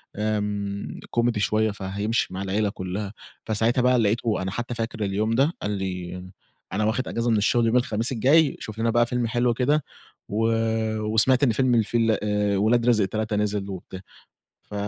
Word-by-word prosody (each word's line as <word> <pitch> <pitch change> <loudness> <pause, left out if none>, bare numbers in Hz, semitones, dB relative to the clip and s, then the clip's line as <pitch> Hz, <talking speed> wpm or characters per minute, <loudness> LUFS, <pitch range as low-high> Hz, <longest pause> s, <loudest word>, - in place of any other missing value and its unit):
آمم 105 -1 -3 0.2
comedy 120 -2 +2
شوية 110 +1 +1
فهيمشي 100 +3 -2
مع 95 - -4
العيلة 100 +2 0
كلّها، 100 +2 -5 0.3
فساعتها 115 +3 +1
بقى 125 0 +4
لقيته 110 0 +1
أنا 95 0 -3
حتى 120 +4 -4
فاكر 115 -1 -3
اليوم 105 +3 0
ده، 140 +7 +2
قال 105 - -2
لي: 90 -2 -4 0.5
"أنا 105 +3 0
واخد 115 +4 0
اجازة 115 +1 -1
من 110 - +3
الشُغل 115 +3 +2
يوم 115 - +1
الخميس 115 -1 0
الجاي 140 +5 +3
شوف 110 0 -8
لنا 115 +1 +1
بقى 120 +1 +3
فيلم 120 -1 -1
حلو 120 +1 +1
كده 140 +5 +1 0.5
و 110 +2 -1 0.6
وسمعت 110 +5 +3
إن 125 - +4
فيلم 125 +2 +2
الفيل 115 0 +2
آآ 105 -1 +1
ولاد 115 +4 +2
رزق 110 -5 +3
3 110 +2 -2
نزل 105 -1 -1
وبتا" 95 0 -8 0.7
ف - - -11
110 Hz, 175 wpm, -24 LUFS, 100-120 Hz, 0.7 s, بقى